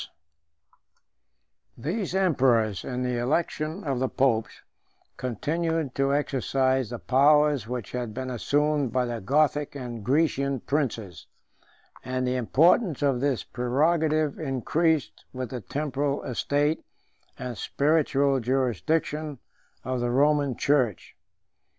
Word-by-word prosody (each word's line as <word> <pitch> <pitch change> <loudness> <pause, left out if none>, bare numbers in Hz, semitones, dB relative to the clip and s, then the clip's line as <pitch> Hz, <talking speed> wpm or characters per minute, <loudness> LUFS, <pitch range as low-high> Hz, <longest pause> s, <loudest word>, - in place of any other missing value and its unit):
] 65 -4 -49
These 190 +1 -2
emperors, 125 - +2
in 125 0 -3
the 125 -1 -1
election 155 +6 -1
of 135 -4 -1
the 130 0 0
popes, 115 -4 0 0.5
continued 155 +4 -2
to 135 0 +1
exercise 130 -2 0
the 120 - -5
powers 145 -1 +3
which 125 -4 -5
had 125 -3 -3
been 130 +3 -5
assumed 145 +2 +1
by 125 +1 +1
the 120 -2 -4
Gothic 145 +5 +1
and 120 -5 -6
Grecian 140 -1 +1
princes; 115 - -3 0.8
and 130 0 -2
the 125 0 0
importance 155 - +3
of 135 -3 +1
this 140 -3 0
prerogative 155 +4 +1
increased 155 +2 0
with 130 -3 -5
the 125 - -5
temporal 140 +4 -2
estate 145 +5 0 0.5
and 125 -1 -5
spiritual 140 0 +1
jurisdiction 135 - -1 0.5
of 130 0 -2
the 120 0 -1
Roman 140 0 +2
church. 130 - 0
135 Hz, 115 wpm, -26 LUFS, 125-150 Hz, 0.8 s, powers